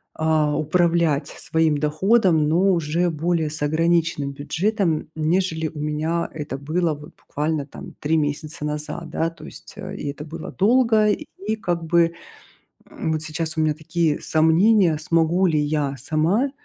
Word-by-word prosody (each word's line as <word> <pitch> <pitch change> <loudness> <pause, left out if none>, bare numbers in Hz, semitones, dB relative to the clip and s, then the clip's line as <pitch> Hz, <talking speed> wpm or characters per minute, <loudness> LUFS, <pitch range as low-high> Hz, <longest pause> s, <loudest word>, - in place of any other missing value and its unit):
а, 155 -2 +1
управлять 165 -2 +1
своим 160 -2 0
доходом, 160 +1 +2
но 185 +5 +3
уже 170 +2 0
более 160 0 0
с 155 +1 -6
ограниченным 165 -1 +1
бюджетом, 175 +6 0
м, - - -12
нежели 160 0 0
у 150 -1 -8
меня 155 +3 -1
это 150 -3 -5
было, 160 +3 0
вот, 150 +1 -11
буквально 150 -1 -3
там - - -11
3 160 +2 +1
месяца 150 +1 -3
назад, 150 +2 -4
да, 165 - -1
то 165 - -13
есть. - - -11
Э, - - -7
и - - -5
это 150 +1 -7
было 160 +1 -7
долго, 220 0 +3
и 210 +1 -3
как 175 -6 -2
бы, 170 0 +3 0.8
м, 160 - -3
вот 155 - -1
сейчас 160 +1 -3
у - - 0
меня 155 -1 +2
такие 160 0 -1
сомнения, 165 +2 +3
смогу 165 +3 +2
ли 155 -3 +2
я 145 -2 -1
сама, 165 - +1
160 Hz, 160 wpm, -22 LUFS, 150-170 Hz, 0.8 s, но